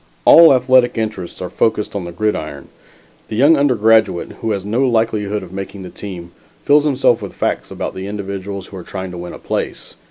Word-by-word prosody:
All 165 -1 +9
athletic 130 -2 +3
interests 105 -5 -4
are 90 - -5
focused 110 -2 0
on 95 -3 -3
the 85 - -6
gridiron. 105 +5 -3 0.6
The - - -5
young 145 +8 +5
undergraduate 110 - +2
who 115 - -2
has 100 -3 -2
no 110 +5 0
likelihood 105 -3 0
of 90 0 -11
making 95 0 -7
the 90 - -9
team, 90 -4 -8 0.3
fills 145 +1 +4
himself 130 -5 +2
with 100 - -8
facts - - -2
about - - -5
the 95 +1 -6
individuals 100 -1 -5
who 95 - -11
are 90 - -8
trying 95 0 -6
to 90 - -8
win 90 0 -7
a - - -8
place. - - -4
105 Hz, 195 wpm, -18 LUFS, 95-115 Hz, 0.6 s, All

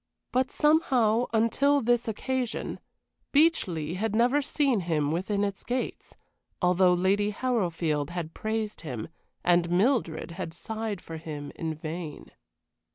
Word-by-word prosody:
But 255 +1 +2
somehow, 250 -7 +3
until 235 +6 +3
this 240 -1 +1
occasion, 245 +2 -2 0.5
Beechleigh 190 - +2
had 220 +1 -1
never 245 +6 +4
seen 280 -4 +1
him 155 -5 0
within 195 +5 0
its 200 -1 -3
gates, 250 +1 -4 0.4
although 180 0 +4
Lady 195 +3 +2
Harrowfield 175 - 0
had 170 -2 -5
praised 220 -1 -3
him, 125 -8 -5 0.3
and 175 -1 +3
Mildred 180 - +1
had 170 -2 -6
sighed 220 -1 -4
for 165 - -7
him 150 -3 -6
in 160 -1 -3
vain. 160 0 -6
200 Hz, 125 wpm, -28 LUFS, 165-240 Hz, 0.5 s, never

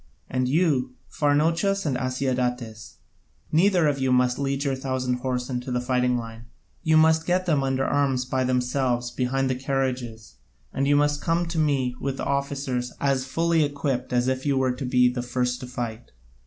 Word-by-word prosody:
And 130 -1 0
you, 135 -4 +1
Pharnouchus 165 +7 +1
and 140 -4 0
Asiadatas, 125 -3 -2 0.6
neither 180 +1 +4
of 140 -2 0
you 130 -1 +1
must 125 0 +2
lead 140 0 -1
your 140 -2 0
thousand 130 -1 -2
horse 125 -1 -2
into 125 0 -4
the 125 - 0
fighting 125 0 +1
line, 115 0 -8 0.4
you 160 -2 +3
must 160 0 +4
get 180 +1 +1
them 155 -6 +2
under 135 0 0
arms 135 -3 +1
by 130 0 0
themselves 125 -1 0
behind 130 +2 0
the 130 - +1
carriages: 130 -4 -3 0.4
and 135 +1 0
then 145 +1 +4
come 170 +1 +1
to 165 -1 -3
me 135 -5 +1
with 135 -1 -3
the - - -4
other - - -1
officers 135 -3 -2
as 135 -2 +1
fully 165 +4 +1
equipt 140 -3 -2
as 125 0 +1
if 130 0 -1
you 140 -2 +1
were 130 -1 +2
to 125 +2 -5
be 125 0 +4
the 125 0 -1
first 125 0 -1
to 130 - -7
fight. 120 -2 -5
130 Hz, 180 wpm, -25 LUFS, 125-145 Hz, 0.6 s, neither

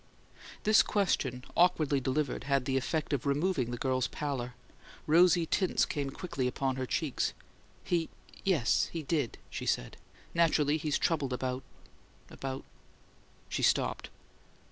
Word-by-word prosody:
This 215 0 +6
question, 135 - 0
awkwardly 155 -5 +3
delivered, 130 0 -1
had 140 -2 +1
the 135 - 0
effect 150 +3 -1
of 140 0 -1
removing 140 -3 +1
the 120 - -3
girl's 130 0 0
pallor; 130 -4 -4 0.5
rosy 170 +2 +5
tints 185 +3 +2
came 145 -3 -2
quickly 135 -3 -3
upon 130 +1 -1
her 130 -1 -2
cheeks. 155 -2 -1 0.5
"He 170 -2 0 0.3
yes, 170 - +2
he 165 -2 -4
did," 145 -5 -1
she - - -5
said. - - -1 0.4
"Naturally, 155 -3 +3
he's 150 -1 0
troubled 145 -6 0
about 125 +1 -2 0.7
about 135 0 -5 0.5
" - - -31
She - - -3
stopped. - - +1
145 Hz, 135 wpm, -31 LUFS, 130-165 Hz, 0.7 s, This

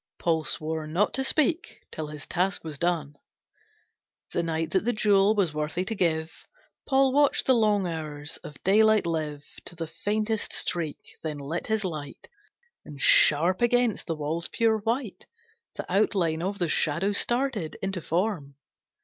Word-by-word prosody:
Paul 160 -2 0
swore 155 0 -2
not 175 +7 +1
to 265 - 0
speak 315 +5 0
till 155 -1 -5
his 150 -2 -9
task 185 +3 -1
was 155 -4 -7
done. 160 -5 -1 1.1
The - - 0
night 165 -1 -2
that 190 - +1
the 240 +2 0
jewel 205 -1 +3
was 185 -7 +1
worthy 155 +4 -2
to 225 - -3
give. 160 -5 0 0.6
Paul 270 -1 +3
watched 290 0 +3
the 260 - +5
long 210 -4 +2
hours 155 -3 -5
of 150 - -11
daylight 215 +1 +4
live 155 -3 -3 0.2
To 175 - -9
the 165 0 -4
faintest 215 +5 -2
streak; 160 -4 -4
then 155 -2 -4
lit 145 +5 -4
his 220 -2 0
light, 150 -5 -6 0.6
And 145 - -11
sharp 170 - +5
against 240 -2 +1
the 165 - -1
wall's 155 +3 -3
pure 225 -1 +1
white 230 0 -3 0.5
The - - -5
outline 180 -4 +1
of 195 +3 -2
the 175 - 0
Shadow 165 +5 +1
started 240 - 0
Into 195 -2 -3
form. 165 -5 -2
175 Hz, 160 wpm, -26 LUFS, 155-215 Hz, 1.1 s, the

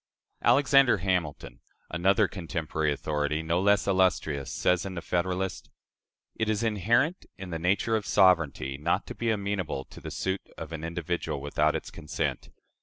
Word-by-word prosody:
" - - -48
Alexander 135 -4 +5
Hamilton 90 -5 -2 0.3
another 95 +5 +3
contemporary 80 -4 -2
authority, 75 +1 -1
no 85 +3 +1
less 100 -1 +3
illustrious 90 -7 +1
says, 90 -2 +1
in 95 -1 -6
the 85 - -4
"Federalist": 90 +1 -2 0.6
"It 110 -1 -1
is 110 +1 0
inherent 115 - +1
in 95 -2 -8
the 80 - -3
nature 100 +6 +1
of 105 -3 -2
sovereignty, 80 -7 +3
not 85 +6 0
to - - -7
be 115 - -2
amenable 100 -9 -2
to - - -13
the - - -6
suit 95 +1 -2 0.2
of 80 0 -7
an 80 -1 -6
individual 85 -2 -3
without 75 +2 +1
its - - -5
consent. 75 - -3
90 Hz, 160 wpm, -28 LUFS, 80-100 Hz, 0.6 s, Alexander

